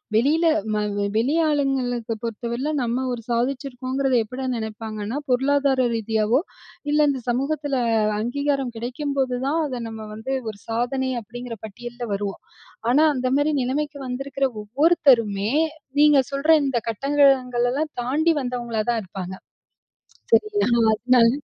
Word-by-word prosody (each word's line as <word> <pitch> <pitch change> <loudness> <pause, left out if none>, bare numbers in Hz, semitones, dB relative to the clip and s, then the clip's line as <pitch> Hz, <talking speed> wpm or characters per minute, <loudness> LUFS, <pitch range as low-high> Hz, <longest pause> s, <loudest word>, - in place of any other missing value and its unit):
வெளியில 295 +9 +3 0.7
வெளி 255 +7 +2
ஆளுங்களுக்கு 260 -6 0
பொறுத்தவரையில 235 +4 -3
நம்ம 240 +2 -1
ஒரு 240 - -5
சாதிச்சிருக்கோங்கிறத, 260 +2 -1
எப்படிடா 255 +4 -6
நினைப்பாங்கன்னா, 220 +1 -5
பொருளாதார 265 0 +2
ரீதியாவோ, 220 +2 +1 0.5
இல்ல 300 0 +4
இந்த 270 -2 -2
சமூகத்தில 275 +3 -1 0.4
அங்கீகாரம் 275 +2 -1
கிடைக்கும்போதுதான், 265 +3 -1
அத 255 -4 -4
நம்ம 220 -1 -7
வந்து 220 +5 -4 0.2
ஒரு 205 -2 -9
சாதனை 245 +3 -1
அப்படிங்கிற 235 +2 -8
பட்டியல்ல 240 +3 -7
வருவோம். 200 0 -3 0.5
ஆனா, 300 +5 +5
அந்த 255 0 0
மாரி 295 +2 +2
நிலமைக்கு 285 +3 -2
வந்திருக்கிற 275 +2 -1 0.2
ஒவ்வொருத்தருமே, 235 - +3 0.5
நீங்க 295 -1 +6
சொல்ற 280 +3 -2 0.2
இந்த 265 -3 +1
கட்டங்களெல்லாம் 270 +1 +2
தாண்டி, 300 +7 +2
வந்தவங்களா 240 -3 -2
தான் 230 -2 0
இருப்பாங்க. 185 0 -6 1.0
சரி 430 - +5 0.2
ஆனா 235 -1 +2
அதனால, 240 +1 +4
250 Hz, 115 wpm, -23 LUFS, 230-275 Hz, 1.0 s, நீங்க